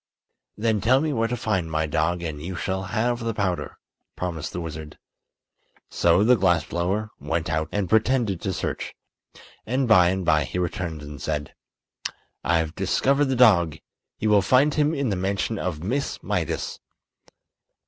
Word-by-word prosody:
"Then 110 -1 +1
tell 130 +4 +4
me 155 0 0
where 115 -2 +1
to 125 - -2
find 95 -7 -1
my 80 0 0
dog 80 +3 0
and 75 -3 -4
you 90 +4 -5
shall 95 +2 -2
have 120 +5 0
the 115 -2 -3
powder," 95 -4 -2 0.4
promised 85 -4 -4
the - - -4
wizard. 80 -2 -7 0.9
So 85 +3 +3
the 125 +3 +6
glass 90 -6 +2
blower 95 +5 -2
went 80 +3 -2
out 80 0 -1
and 100 -2 -1
pretended 110 -2 +2
to 95 - -1
search, 90 0 -4 0.7
and 130 +3 0
by 90 -5 +6
and 95 0 -1
by 75 -3 +3
he 90 - -5
returned 85 -3 -3
and 75 -1 -9
said: 75 -1 -3 0.9
"I've 80 -1 +1
discovered 135 +10 +2
the 135 -1 0
dog. 85 -11 +5 0.4
You 110 - 0
will 105 -1 +6
find 130 +9 +4
him 150 +1 +2
in 140 -3 0
the 100 - 0
mansion 100 +3 -1
of 80 -4 -3
Miss 135 +9 -1
Mydas." - - -2
95 Hz, 165 wpm, -24 LUFS, 80-115 Hz, 0.9 s, the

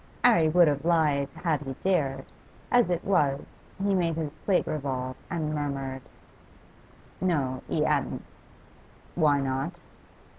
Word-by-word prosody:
'Arry 170 -10 +5
would 175 +1 +6
have 145 -1 0
lied 150 -4 +2
had 160 -5 0
he 135 -2 -5
dared; 140 -8 +1 0.5
as 245 -5 +4
it 175 0 -1
was, 145 -8 +2 0.4
he 200 0 +2
made 170 -3 +1
his 155 -2 -3
plate 190 -3 +3
revolve, 130 -3 -3
and 155 -3 -2
murmured, 135 -3 -3 1.2
'No; 140 -8 0
he - - +1
'adn't.' - - 0 0.9
'Why 150 -4 +3
not? 135 0 -2
150 Hz, 125 wpm, -27 LUFS, 135-175 Hz, 1.2 s, would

